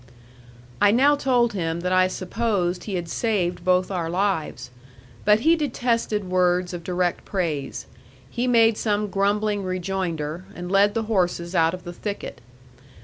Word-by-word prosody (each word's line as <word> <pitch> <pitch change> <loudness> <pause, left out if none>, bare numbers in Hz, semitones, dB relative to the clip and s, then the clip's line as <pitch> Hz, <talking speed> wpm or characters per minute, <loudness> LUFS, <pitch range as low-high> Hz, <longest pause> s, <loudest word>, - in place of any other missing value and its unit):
I 205 - +6
now 270 +7 +4
told 250 -5 +2
him 165 -3 -2
that 180 +1 -1
I 185 0 +4
supposed 185 -1 -2
he 200 - -3
had 175 -2 -3
saved 180 -3 -1
both 185 +1 +2
our 170 -3 -2
lives. 180 -8 -2 0.5
But 210 +1 +5
he 325 +5 +5
detested 235 -7 -1
words 180 -1 +1
of 175 -1 -6
direct 180 0 -1
praise. 165 -8 -3 0.4
He 240 - -2
made 230 -2 +4
some 210 -1 0
grumbling 205 +1 +1
rejoinder, 180 -3 -3
and 175 +1 -6
led 200 +1 +4
the 225 - 0
horses 180 -5 -1
out 165 0 +3
of 180 - -12
the 175 -1 -7
thicket. 205 +3 -6
185 Hz, 150 wpm, -23 LUFS, 175-215 Hz, 0.5 s, I